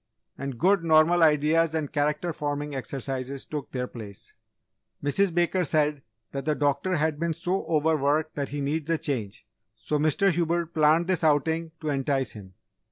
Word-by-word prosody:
And 140 Hz, -3 st, -5 dB
good 190 Hz, +5 st, +3 dB
normal 165 Hz, +2 st, +4 dB
ideas 160 Hz, +1 st, +3 dB
and 155 Hz, -3 st, -2 dB
character 150 Hz, +3 st, 0 dB
forming 145 Hz, 0 st, -3 dB
exercises 135 Hz, 0 st, -4 dB
took 150 Hz, -2 st, -6 dB
their 125 Hz, -1 st, -2 dB
place. 105 Hz, -5 st, -9 dB, 0.7 s
"Mrs. 185 Hz, +7 st, +2 dB
Baker 175 Hz, +2 st, +1 dB
said, 150 Hz, -2 st, +1 dB, 0.3 s
that 135 Hz, 0 st, -5 dB
the 155 Hz, -1 st, +1 dB
doctor 145 Hz, +6 st, 0 dB
has 160 Hz, 0 st, +1 dB
been 165 Hz, -1 st, -1 dB
so 180 Hz, +4 st, -2 dB
over 160 Hz, 0 st, +2 dB
worked 150 Hz, +2 st, 0 dB
that 140 Hz, -2 st, -3 dB
he 145 Hz, +1 st, -4 dB
needs 150 Hz, +3 st, -2 dB
a 165 Hz, -, +2 dB
change, 115 Hz, -10 st, -3 dB, 0.3 s
so 150 Hz, +5 st, -2 dB
Mr. 155 Hz, +6 st, +3 dB
Hubert 170 Hz, 0 st, -1 dB
planned 155 Hz, +1 st, +4 dB
this 180 Hz, -2 st, 0 dB
outing 160 Hz, +2 st, +1 dB
to 155 Hz, -, -2 dB
entice 135 Hz, -3 st, 0 dB
him. 95 Hz, -4 st, -12 dB
150 Hz, 165 wpm, -26 LUFS, 140-165 Hz, 0.7 s, normal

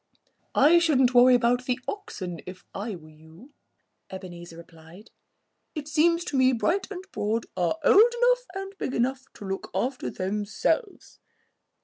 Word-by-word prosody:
"I 315 Hz, +5 st, +6 dB
shouldn't 265 Hz, -7 st, +3 dB
worry 250 Hz, +1 st, +7 dB
about 245 Hz, +1 st, +1 dB
the 250 Hz, 0 st, -1 dB
oxen 185 Hz, -, -6 dB
if 185 Hz, 0 st, -9 dB
I 205 Hz, +1 st, -4 dB
were 160 Hz, -3 st, -14 dB
you," 160 Hz, -, -17 dB, 0.6 s
Ebenezer 175 Hz, -3 st, -9 dB
replied. 165 Hz, +4 st, -15 dB, 0.6 s
"It 300 Hz, -2 st, -5 dB
seems 335 Hz, +3 st, +2 dB
to 290 Hz, -, -3 dB
me 260 Hz, 0 st, +4 dB
Bright 290 Hz, -, 0 dB
and 375 Hz, -2 st, -7 dB
Broad 220 Hz, +2 st, -2 dB
are 175 Hz, -, 0 dB
old 445 Hz, +10 st, +6 dB
enough -, -, +3 dB
and 390 Hz, 0 st, -6 dB
big 260 Hz, -, -3 dB
enough 260 Hz, +2 st, 0 dB
to 205 Hz, -, -10 dB
look 195 Hz, 0 st, -5 dB
out 255 Hz, +1 st, -1 dB
for -, -, -4 dB
themselves." 210 Hz, -, -2 dB
245 Hz, 150 wpm, -26 LUFS, 190-315 Hz, 0.6 s, worry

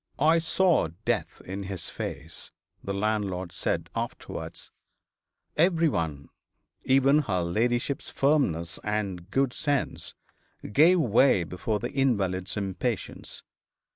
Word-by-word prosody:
'I 160 Hz, +5 st, +4 dB
saw 165 Hz, -, +3 dB, 0.2 s
death -, -, -1 dB
in 95 Hz, +2 st, -5 dB
his 95 Hz, -3 st, -5 dB
face,' 75 Hz, +4 st, -6 dB, 0.3 s
the 100 Hz, -, -3 dB
landlord 100 Hz, -3 st, -1 dB
said, -, -, -1 dB
afterwards. -, -, -5 dB, 0.8 s
Every 165 Hz, 0 st, +4 dB
one, 80 Hz, -, -3 dB, 0.5 s
even 135 Hz, +2 st, +5 dB
her 100 Hz, -11 st, 0 dB
ladyship's 120 Hz, +9 st, 0 dB
firmness 90 Hz, -, +1 dB
and 100 Hz, -4 st, -2 dB
good 135 Hz, +2 st, +1 dB
sense, 145 Hz, -3 st, -2 dB, 0.6 s
gave 165 Hz, -, +6 dB
way 120 Hz, -, +4 dB
before 90 Hz, +5 st, -2 dB
the -, -, -4 dB
invalid's 100 Hz, -9 st, 0 dB
impatience. 100 Hz, +3 st, -3 dB
105 Hz, 105 wpm, -27 LUFS, 95-140 Hz, 0.8 s, gave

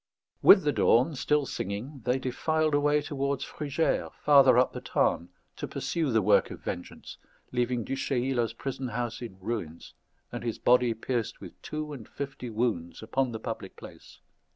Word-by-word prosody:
With -, -, +8 dB
the -, -, +2 dB
dawn, 130 Hz, +8 st, +3 dB
still 145 Hz, +2 st, +1 dB
singing, 120 Hz, +7 st, -5 dB
they 125 Hz, +1 st, +2 dB
defiled 155 Hz, +4 st, 0 dB
away 145 Hz, 0 st, +3 dB
towards 140 Hz, -2 st, -2 dB
Frugères, 150 Hz, +2 st, -1 dB
farther 135 Hz, -4 st, +7 dB
up 125 Hz, -, +3 dB
the -, -, -6 dB
Tarn, 85 Hz, +2 st, 0 dB, 0.3 s
to -, -, -4 dB
pursue 165 Hz, -4 st, -2 dB
the 110 Hz, -4 st, +2 dB
work 105 Hz, +1 st, +4 dB
of -, -, -8 dB
vengeance, 90 Hz, -, -7 dB, 0.3 s
leaving 125 Hz, -1 st, 0 dB
Du 135 Hz, -, -3 dB
Chayla's 125 Hz, -3 st, 0 dB
prison 130 Hz, +2 st, -4 dB
house 120 Hz, -1 st, -3 dB
in 115 Hz, -6 st, -8 dB
ruins, 95 Hz, -6 st, -5 dB, 0.4 s
and -, -, -5 dB
his 115 Hz, -2 st, -2 dB
body 125 Hz, -2 st, +3 dB
pierced 115 Hz, 0 st, -3 dB
with -, -, -12 dB
two 155 Hz, -1 st, -5 dB
and 120 Hz, -6 st, -10 dB
fifty 135 Hz, -3 st, -6 dB
wounds 105 Hz, -7 st, -2 dB
upon 130 Hz, +3 st, 0 dB
the 110 Hz, -, -5 dB
public -, -, -6 dB
place. -, -, -13 dB
125 Hz, 165 wpm, -28 LUFS, 115-140 Hz, 0.4 s, With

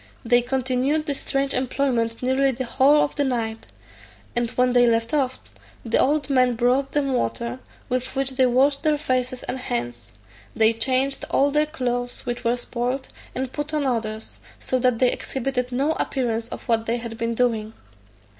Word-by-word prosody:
They 240 Hz, +1 st, +4 dB
continued 260 Hz, +4 st, 0 dB
this 285 Hz, -3 st, -1 dB
strange 275 Hz, 0 st, 0 dB
employment 250 Hz, -3 st, 0 dB
nearly 265 Hz, +2 st, +3 dB
the 260 Hz, 0 st, -3 dB
whole 275 Hz, +5 st, +4 dB
of 285 Hz, -, -2 dB
the 290 Hz, -, +1 dB
night, 230 Hz, -4 st, -2 dB, 0.7 s
and 240 Hz, -1 st, +1 dB
when 250 Hz, +1 st, +1 dB
they 245 Hz, -1 st, +5 dB
left 230 Hz, +3 st, +1 dB
off, 265 Hz, -4 st, 0 dB, 0.5 s
the 230 Hz, -, +2 dB
old 295 Hz, +1 st, +2 dB
man 255 Hz, -3 st, +3 dB
brought 255 Hz, +4 st, +1 dB
them 275 Hz, -2 st, +1 dB
water, 235 Hz, -, -2 dB, 0.3 s
with 255 Hz, +1 st, -1 dB
which 270 Hz, 0 st, 0 dB
they 260 Hz, -1 st, +3 dB
washed 275 Hz, +3 st, +3 dB
their 305 Hz, -2 st, +2 dB
faces 255 Hz, -2 st, -1 dB
and 260 Hz, -, -4 dB
hands; 120 Hz, -, -4 dB, 0.4 s
they 220 Hz, 0 st, +4 dB
changed 260 Hz, +4 st, 0 dB
all 280 Hz, +1 st, +3 dB
their 300 Hz, +1 st, +2 dB
clothes, 245 Hz, -5 st, -3 dB
which 240 Hz, -1 st, -3 dB
were 235 Hz, +1 st, +1 dB
spoiled, 245 Hz, +2 st, -3 dB, 0.3 s
and 260 Hz, 0 st, -3 dB
put 295 Hz, +1 st, -3 dB
on 295 Hz, -2 st, 0 dB
others; 220 Hz, -4 st, -3 dB, 0.2 s
so 255 Hz, -, -1 dB
that 250 Hz, -2 st, +2 dB
they 250 Hz, +1 st, +3 dB
exhibited 255 Hz, -1 st, -3 dB
no 275 Hz, +5 st, +1 dB
appearance 235 Hz, -7 st, -1 dB
of -, -, -8 dB
what 225 Hz, -1 st, +1 dB
they 235 Hz, +1 st, +1 dB
had 230 Hz, -1 st, -6 dB
been 230 Hz, 0 st, -1 dB
doing. 225 Hz, -3 st, 0 dB
255 Hz, 175 wpm, -23 LUFS, 235-270 Hz, 0.7 s, they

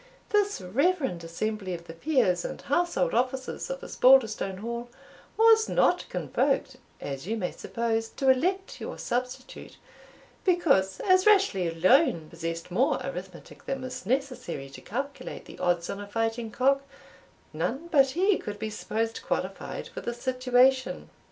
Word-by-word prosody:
This 410 Hz, -1 st, +2 dB
reverend 265 Hz, -, 0 dB
assembly 190 Hz, +2 st, -3 dB
of 170 Hz, 0 st, -10 dB
the 165 Hz, -, -9 dB
peers 185 Hz, -, +1 dB
and -, -, -5 dB
household 350 Hz, -, 0 dB
officers 260 Hz, -, -1 dB
of -, -, -5 dB
Osbaldistone 230 Hz, -, +4 dB
Hall 235 Hz, +3 st, -5 dB, 0.5 s
was 445 Hz, 0 st, +6 dB
not -, -, +2 dB
convoked, 270 Hz, -1 st, 0 dB, 0.2 s
as 140 Hz, +3 st, -6 dB
you 225 Hz, +2 st, -1 dB
may 180 Hz, -4 st, -2 dB
suppose, 225 Hz, -1 st, -2 dB
to 270 Hz, -, 0 dB
elect 370 Hz, +9 st, -1 dB
your -, -, -5 dB
substitute, 250 Hz, +1 st, -4 dB, 0.7 s
because, 275 Hz, -, +2 dB
as 370 Hz, +1 st, +4 dB
Rashleigh 390 Hz, -, +4 dB
alone 175 Hz, -, +3 dB
possessed 165 Hz, +1 st, -5 dB
more 245 Hz, +9 st, +2 dB
arithmetic -, -, -8 dB
than 270 Hz, -1 st, -3 dB
was 255 Hz, -3 st, -6 dB
necessary 255 Hz, -, -2 dB
to -, -, -11 dB
calculate 275 Hz, +5 st, -5 dB
the -, -, -12 dB
odds 175 Hz, -1 st, +1 dB
on 200 Hz, -, -5 dB
a 205 Hz, -, -7 dB
fighting 225 Hz, +2 st, -2 dB
cock, 275 Hz, +5 st, +2 dB, 0.7 s
none 305 Hz, +6 st, -2 dB
but 275 Hz, -3 st, +5 dB
he 390 Hz, +2 st, +3 dB
could 205 Hz, 0 st, -6 dB
be 215 Hz, +1 st, -4 dB
supposed 225 Hz, +1 st, -3 dB
qualified -, -, -3 dB
for -, -, -7 dB
the 240 Hz, -, -4 dB
situation. 255 Hz, +1 st, +2 dB
250 Hz, 145 wpm, -27 LUFS, 195-280 Hz, 0.7 s, was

